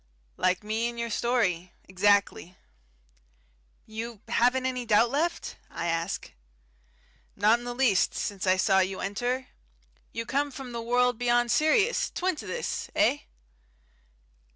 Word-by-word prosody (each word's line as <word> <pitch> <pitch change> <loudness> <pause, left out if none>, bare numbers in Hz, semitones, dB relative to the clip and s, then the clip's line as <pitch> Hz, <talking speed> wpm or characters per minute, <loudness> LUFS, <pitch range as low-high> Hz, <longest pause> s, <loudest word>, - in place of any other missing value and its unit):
"Like 185 +2 +1
me 220 +3 -1
and 235 - -9
your 235 0 -3
story 210 -7 0
exactly." 190 -2 +1 1.3
"You 220 0 -7
haven't 250 +2 +2
any 250 -1 -1
doubt 230 +1 +3
left?" 325 +5 -2
I 170 - -5
ask. 165 +2 -2 1.0
"Not 215 +4 +4
in 240 - -10
the 245 0 -4
least, 245 -8 +2
since 195 -2 -3
I 185 0 +4
saw 190 0 +3
you 190 0 0
enter. 245 +6 -2 0.6
You 230 0 -4
come 285 +4 0
from 265 -2 -8
the 235 -1 -4
world 245 0 +1
beyond 240 -1 +2
Sirius, 395 +10 +3
twin 370 0 -1
to 215 - -8
this. 185 - -3
Eh?" - - +3
235 Hz, 135 wpm, -27 LUFS, 195-250 Hz, 1.3 s, Not